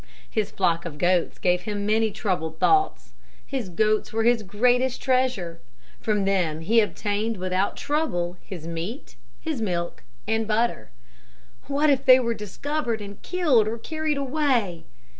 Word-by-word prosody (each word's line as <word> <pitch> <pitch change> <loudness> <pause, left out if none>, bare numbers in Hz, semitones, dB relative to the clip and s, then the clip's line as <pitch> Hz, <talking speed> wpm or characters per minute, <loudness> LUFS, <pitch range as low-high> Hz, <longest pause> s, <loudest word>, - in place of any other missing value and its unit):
His 215 -2 -1
flock 170 -3 +1
of 160 -4 -7
goats 175 +1 +1
gave 180 0 +2
him 205 +1 -3
many 220 +1 +2
troubled 180 -6 -2
thoughts. 390 - +2 0.3
His 260 -8 -4
goats 215 +4 +1
were 225 0 0
his 235 0 +4
greatest 245 +6 +1
treasure. 255 -11 0 0.4
From 210 -3 0
them 175 -5 +1
he 225 +8 +4
obtained 210 +1 -1
without 185 +1 -1
trouble 180 - -1
his 175 -5 -8
meat, 170 - -6 0.3
his 310 -7 -3
milk 175 -5 -2 0.3
and 220 0 0
butter. 225 - 0 0.8
"What 290 +2 +3
if 270 -1 +1
they 255 0 +8
were 235 -2 0
discovered 235 +4 -3
and 200 -1 -9
killed 305 - +2
or 225 +2 -2
carried 310 +4 -2
away?" 255 - 0
215 Hz, 145 wpm, -25 LUFS, 185-255 Hz, 0.8 s, they